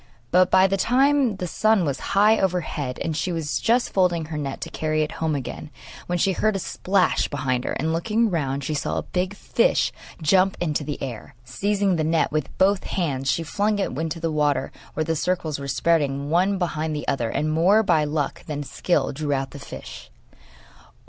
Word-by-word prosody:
But 180 Hz, 0 st, +5 dB
by 190 Hz, 0 st, +5 dB
this 195 Hz, 0 st, +1 dB
time 265 Hz, -1 st, +3 dB
the 185 Hz, -, -4 dB
sun 215 Hz, +1 st, +2 dB
was 135 Hz, -3 st, -2 dB, 0.2 s
high 215 Hz, +2 st, +5 dB
overhead, 165 Hz, -8 st, -1 dB
and 160 Hz, -2 st, -2 dB
she 180 Hz, +4 st, -1 dB
was 160 Hz, -3 st, -2 dB
just 240 Hz, +2 st, +2 dB
folding 175 Hz, -4 st, +2 dB
her 155 Hz, 0 st, -5 dB
net 140 Hz, -2 st, -4 dB
to -, -, -6 dB
carry 155 Hz, 0 st, 0 dB
it 150 Hz, -, -4 dB
home 160 Hz, -2 st, +1 dB
again, 135 Hz, -3 st, -6 dB, 0.4 s
when 175 Hz, -, 0 dB
she 190 Hz, +3 st, +2 dB
heard 215 Hz, +3 st, +1 dB
a -, -, -1 dB
splash 185 Hz, +1 st, +1 dB
behind 130 Hz, -3 st, -2 dB
her, -, -, -2 dB
and 160 Hz, 0 st, -1 dB
looking 215 Hz, +6 st, +1 dB
round 140 Hz, -4 st, -1 dB
she 155 Hz, -, -2 dB
saw 145 Hz, -, -2 dB
a -, -, -1 dB
big 185 Hz, +2 st, -2 dB
fish -, -, +1 dB, 0.3 s
jump 185 Hz, +4 st, +3 dB
into 155 Hz, -3 st, -1 dB
the 145 Hz, 0 st, -5 dB
air. 120 Hz, -3 st, -7 dB
Seizing 195 Hz, +6 st, 0 dB
the 155 Hz, -, 0 dB
net 160 Hz, +1 st, +1 dB
with 150 Hz, -2 st, -1 dB
both 195 Hz, +1 st, +3 dB
hands, 135 Hz, -7 st, -1 dB
she 165 Hz, -, +1 dB
flung 205 Hz, +6 st, 0 dB
it 200 Hz, -, -1 dB
into 160 Hz, +4 st, -3 dB
the 165 Hz, 0 st, -1 dB
water 150 Hz, -2 st, +1 dB, 0.2 s
where 155 Hz, -, 0 dB
the 165 Hz, +1 st, -1 dB
circles 160 Hz, -3 st, -1 dB
were 140 Hz, -, -6 dB
spreading 140 Hz, -1 st, +1 dB
one 190 Hz, +4 st, +2 dB
behind 160 Hz, -3 st, -2 dB
the 150 Hz, -, -5 dB
other, 120 Hz, -5 st, 0 dB
and, 155 Hz, +5 st, -1 dB
more 190 Hz, +7 st, +4 dB
by 170 Hz, -6 st, +3 dB
luck 150 Hz, -1 st, -2 dB
than 145 Hz, -2 st, -3 dB
skill, 145 Hz, 0 st, 0 dB
drew 145 Hz, +1 st, -3 dB
out 135 Hz, -1 st, -2 dB
the 145 Hz, -, -9 dB
fish. -, -, -9 dB
165 Hz, 200 wpm, -23 LUFS, 145-190 Hz, 0.4 s, But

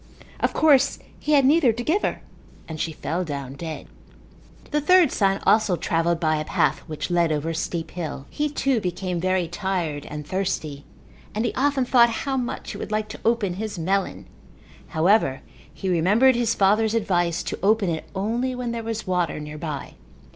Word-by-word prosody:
Of -, -, 0 dB
course 280 Hz, -3 st, +4 dB, 0.2 s
he 300 Hz, -, 0 dB
had 280 Hz, -2 st, +5 dB
neither 285 Hz, -3 st, +5 dB
to 240 Hz, +2 st, -4 dB
give 345 Hz, -, +1 dB
her -, -, -2 dB, 0.4 s
and 160 Hz, -1 st, -7 dB
she 165 Hz, -, -1 dB
fell 160 Hz, +4 st, -3 dB
down 140 Hz, -5 st, -5 dB
dead. 160 Hz, +2 st, -6 dB, 0.9 s
The 300 Hz, 0 st, +1 dB
third 360 Hz, -1 st, +5 dB
son 195 Hz, -1 st, +1 dB
also 215 Hz, -4 st, +4 dB
travelled 165 Hz, 0 st, 0 dB
by 155 Hz, -2 st, +1 dB
a 155 Hz, -, -2 dB
path -, -, +1 dB
which 155 Hz, +3 st, -4 dB
led 170 Hz, -2 st, +2 dB
over 155 Hz, +2 st, -1 dB
a -, -, -3 dB
steep 165 Hz, 0 st, -3 dB
hill. 155 Hz, -5 st, -5 dB
He, 300 Hz, 0 st, -1 dB
too, 270 Hz, -5 st, 0 dB
became 180 Hz, -1 st, -2 dB
very 185 Hz, 0 st, +1 dB
tired 170 Hz, -4 st, -3 dB
and 150 Hz, 0 st, -6 dB
thirsty 155 Hz, -6 st, -3 dB, 0.5 s
and 220 Hz, +2 st, 0 dB
he -, -, -1 dB
often 275 Hz, -1 st, +1 dB
thought 240 Hz, -1 st, +5 dB, 0.2 s
how 275 Hz, -1 st, 0 dB
much 250 Hz, -2 st, -3 dB
he -, -, -7 dB
would -, -, -6 dB
like 215 Hz, 0 st, -1 dB
to -, -, -8 dB
open 225 Hz, -5 st, +1 dB
his 210 Hz, +1 st, -5 dB
melon. 190 Hz, +4 st, -1 dB, 0.6 s
However, 160 Hz, -5 st, +2 dB, 0.3 s
he 190 Hz, -, -6 dB
remembered 200 Hz, +9 st, +4 dB
his 235 Hz, -1 st, +1 dB
father's 215 Hz, +3 st, +3 dB
advice 175 Hz, -5 st, +1 dB
to -, -, -4 dB
open 205 Hz, +1 st, +3 dB
it 160 Hz, -, -5 dB
only 235 Hz, +6 st, -1 dB
where 250 Hz, -1 st, -3 dB
there 235 Hz, 0 st, -3 dB
was 225 Hz, -1 st, -4 dB
water 180 Hz, -4 st, 0 dB
nearby. 150 Hz, -1 st, -6 dB
190 Hz, 185 wpm, -24 LUFS, 165-235 Hz, 0.9 s, had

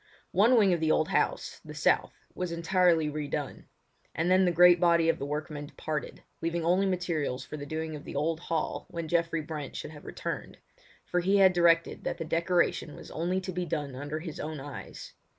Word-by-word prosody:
One 225 Hz, +7 st, +5 dB
wing 200 Hz, -4 st, +5 dB
of 170 Hz, -, 0 dB
the 160 Hz, 0 st, +1 dB
old 155 Hz, -, +2 dB
house, -, -, 0 dB
the -, -, -10 dB
south, -, -, +2 dB, 0.2 s
was 180 Hz, -2 st, -3 dB
entirely 170 Hz, -1 st, +3 dB
re 150 Hz, 0 st, -3 dB
done; 145 Hz, -1 st, -4 dB, 0.5 s
and 165 Hz, +3 st, +1 dB
then 185 Hz, 0 st, +5 dB
the 175 Hz, -, +3 dB
great 175 Hz, +1 st, +7 dB
body 170 Hz, -2 st, +4 dB
of 165 Hz, +1 st, +1 dB
the 140 Hz, -, -3 dB
workmen 150 Hz, 0 st, -4 dB
departed, 150 Hz, 0 st, -5 dB, 0.2 s
leaving 165 Hz, 0 st, -1 dB
only 185 Hz, +3 st, +3 dB
materials 165 Hz, -8 st, -1 dB
for -, -, -7 dB
the 145 Hz, -1 st, -7 dB
doing 160 Hz, +1 st, -3 dB
of 145 Hz, -, -8 dB
the -, -, -8 dB
old 155 Hz, +3 st, 0 dB
hall 165 Hz, -2 st, -3 dB
when 170 Hz, -1 st, -5 dB
Geoffrey 165 Hz, 0 st, +1 dB
Brent 150 Hz, -3 st, -6 dB
should -, -, -6 dB
have 150 Hz, -2 st, -12 dB
returned, -, -, -5 dB, 0.5 s
for 180 Hz, -, 0 dB
he 190 Hz, +3 st, +3 dB
had 190 Hz, -2 st, +6 dB
directed 170 Hz, -1 st, +3 dB
that -, -, -2 dB
the 165 Hz, -, -4 dB
decoration 170 Hz, -2 st, +1 dB
was -, -, -11 dB
only 175 Hz, +4 st, -1 dB
to 185 Hz, -, -5 dB
be 180 Hz, 0 st, -3 dB
done 145 Hz, -4 st, -3 dB
under 145 Hz, +3 st, -4 dB
his 160 Hz, -3 st, -7 dB
own 155 Hz, -1 st, -4 dB
eyes. 140 Hz, -1 st, -9 dB
165 Hz, 205 wpm, -29 LUFS, 150-175 Hz, 0.5 s, great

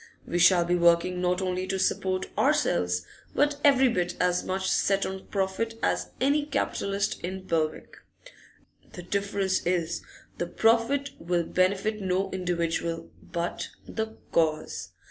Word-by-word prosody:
We 175 Hz, -, -1 dB
shall 175 Hz, 0 st, +6 dB
be 175 Hz, -, +1 dB
working 170 Hz, +1 st, +3 dB
not 180 Hz, +1 st, +1 dB
only 185 Hz, 0 st, -2 dB
to 190 Hz, -, -1 dB
support 185 Hz, 0 st, 0 dB
ourselves, 90 Hz, 0 st, +2 dB, 0.3 s
but 290 Hz, 0 st, +2 dB
every 270 Hz, -2 st, +6 dB
bit 180 Hz, -6 st, 0 dB
as 180 Hz, 0 st, +2 dB
much 190 Hz, 0 st, -2 dB
set 195 Hz, 0 st, +2 dB
on 190 Hz, 0 st, -6 dB
profit 200 Hz, +3 st, -1 dB
as -, -, 0 dB
any 285 Hz, +3 st, +3 dB
capitalist 200 Hz, -8 st, -1 dB
in 185 Hz, +2 st, -5 dB
Belwick. 160 Hz, -3 st, -2 dB, 1.0 s
The 180 Hz, -, -8 dB
difference 200 Hz, 0 st, 0 dB
is, 170 Hz, -1 st, 0 dB
that -, -, -22 dB, 0.3 s
the 175 Hz, -, -1 dB
profit 230 Hz, +8 st, +2 dB
will 170 Hz, 0 st, 0 dB
benefit 195 Hz, +5 st, +1 dB
no 190 Hz, +1 st, 0 dB
individual, 170 Hz, -2 st, -2 dB
but 170 Hz, 0 st, -4 dB, 0.2 s
the 220 Hz, 0 st, -4 dB
Cause. 155 Hz, -1 st, 0 dB
185 Hz, 140 wpm, -27 LUFS, 175-200 Hz, 1.0 s, shall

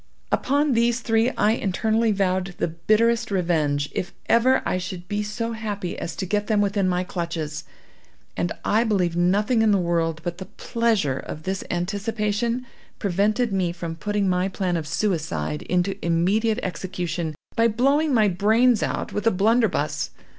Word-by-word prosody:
Upon 285 Hz, +1 st, +2 dB
these 235 Hz, +1 st, +2 dB
three 225 Hz, +1 st, +2 dB
I 210 Hz, -, +4 dB
internally 220 Hz, +2 st, +1 dB
vowed 190 Hz, -2 st, 0 dB
the -, -, 0 dB
bitterest 225 Hz, +8 st, +2 dB
revenge, 155 Hz, -7 st, +1 dB
if 180 Hz, -, -4 dB
ever 255 Hz, +3 st, +4 dB
I 185 Hz, -, 0 dB
should 180 Hz, -1 st, -6 dB
be 205 Hz, +1 st, -1 dB
so 210 Hz, +3 st, -3 dB
happy 205 Hz, -5 st, -4 dB
as -, -, -5 dB
to 190 Hz, -, -3 dB
get 205 Hz, +2 st, -1 dB
them 215 Hz, -2 st, +2 dB
within 200 Hz, -2 st, +1 dB
my 180 Hz, 0 st, 0 dB
clutches; 170 Hz, -4 st, -4 dB, 0.7 s
and 175 Hz, -, -1 dB
I 220 Hz, +3 st, +3 dB
believe 185 Hz, -7 st, +1 dB
nothing 205 Hz, +7 st, +2 dB
in 220 Hz, -, +4 dB
the 205 Hz, -, +4 dB
world 165 Hz, -2 st, 0 dB
but 175 Hz, +1 st, -4 dB
the 190 Hz, -, -7 dB
pleasure 220 Hz, -, 0 dB
of 155 Hz, -, -7 dB
this 190 Hz, 0 st, -3 dB
anticipation 210 Hz, +5 st, -1 dB, 0.3 s
prevented 210 Hz, +4 st, +1 dB
me 185 Hz, -3 st, +1 dB
from 170 Hz, -1 st, -5 dB
putting 205 Hz, +3 st, -1 dB
my 180 Hz, 0 st, +1 dB
plan 185 Hz, -2 st, -1 dB
of 160 Hz, -2 st, -3 dB
suicide 155 Hz, -, -1 dB
into 180 Hz, +2 st, 0 dB
immediate 200 Hz, +7 st, +2 dB
execution, 175 Hz, -3 st, -3 dB, 0.2 s
by 230 Hz, 0 st, +4 dB
blowing 275 Hz, +7 st, +2 dB
my 220 Hz, -5 st, +4 dB
brains 220 Hz, +5 st, +3 dB
out -, -, -2 dB
with 210 Hz, +2 st, -1 dB
a -, -, +5 dB
blunderbuss. 205 Hz, -6 st, +1 dB
200 Hz, 160 wpm, -24 LUFS, 175-225 Hz, 0.7 s, a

